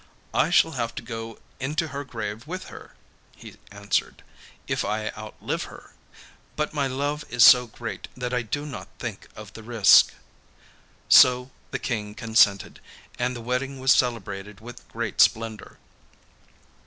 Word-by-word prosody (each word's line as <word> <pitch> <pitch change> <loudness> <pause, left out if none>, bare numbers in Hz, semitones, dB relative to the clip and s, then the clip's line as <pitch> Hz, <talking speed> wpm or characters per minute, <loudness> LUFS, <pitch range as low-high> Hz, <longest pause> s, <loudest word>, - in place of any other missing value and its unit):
'I - - +2
shall 165 -2 +4
have 115 -5 -3
to - - -6
go 115 -1 -7 0.2
into 150 +4 -2
her 140 +1 -5
grave 110 -1 -6
with 185 +3 -6
her,' - - -13 0.4
he - - -13
answered, 100 0 -2 0.4
'if - - -1
I 110 +1 -2
outlive 105 0 -5
her, - - -14 0.6
but 150 0 -2
my 140 -2 0
love 145 +3 -2
is 120 -1 +4
so 125 -1 +7
great 115 +1 -7
that 125 0 -4
I 125 - +1
do 145 +6 -4
not 140 -5 -8
think - - -7
of - - -11
the 115 - -10
risk.' 110 -2 +5 0.9
So 125 +1 +6 0.2
the - - -3
King 105 -3 -4
consented, 110 -3 +2 0.4
and 125 +1 -1
the 120 - -7
wedding 130 +3 -3
was 130 +1 +3
celebrated 105 -5 -1
with 120 +2 -12
great - - -1
splendour. 110 -1 +1
120 Hz, 150 wpm, -25 LUFS, 110-135 Hz, 0.9 s, so